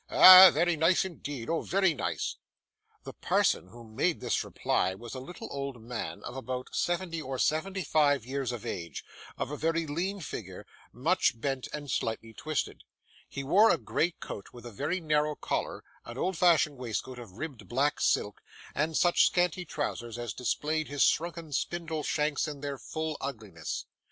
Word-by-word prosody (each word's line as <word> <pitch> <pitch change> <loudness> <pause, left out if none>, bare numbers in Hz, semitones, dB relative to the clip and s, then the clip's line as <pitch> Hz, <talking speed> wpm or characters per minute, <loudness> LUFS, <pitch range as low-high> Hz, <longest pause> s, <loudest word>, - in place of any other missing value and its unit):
Ah! 185 0 +11
very 170 +3 +2
nice 165 +4 +3
indeed. 145 -9 -6
Oh! 165 0 0
very 190 -2 +2
nice!' 140 - -3 0.7
The - - -8
parson - - +1
who 120 +5 -13
made 125 +10 -1
this - - 0
reply 95 - 0
was 115 +4 -9
a 130 - -5
little 160 +7 -8
old 140 -3 -4
man, 115 +1 -6
of 125 - -7
about 130 -1 -5
seventy 175 -2 -1
or 135 -2 -4
seventy 190 +8 0
five 145 -7 +2
years 135 -1 -2
of 120 -4 -6
age, 85 -4 -5 0.3
of - - -3
a 150 - -4
very 165 +2 0
lean 180 +7 -2
figure, 100 - -7 0.3
much 135 -1 +1
bent 135 +1 -2
and 145 -3 -5
slightly 115 0 -2
twisted. 155 +5 -3 0.5
He 140 - -5
wore 205 +11 +5
a - - +4
grey 170 +1 -1
coat 100 - -7
with 120 -1 -12
a 120 - -7
very 145 - -2
narrow 150 -2 +1
collar, - - -3 0.2
an 120 - -9
old 185 +6 -1
fashioned 160 -4 +3
waistcoat 125 +1 -4
of 115 -6 -11
ribbed 115 -4 -7
black 140 +6 +1
silk, 105 - +1 0.3
and 155 +2 0
such 175 -1 +5
scanty 180 0 0
trousers 120 -7 -4
as 120 -3 -4
displayed 155 +5 -1
his 145 -1 +1
shrunken 165 -2 0
spindle 165 +1 -2
shanks 150 +1 0
in 145 -2 -7
their 140 -2 -4
full 155 +5 -4
ugliness. 105 - -5
145 Hz, 170 wpm, -29 LUFS, 125-165 Hz, 0.7 s, Ah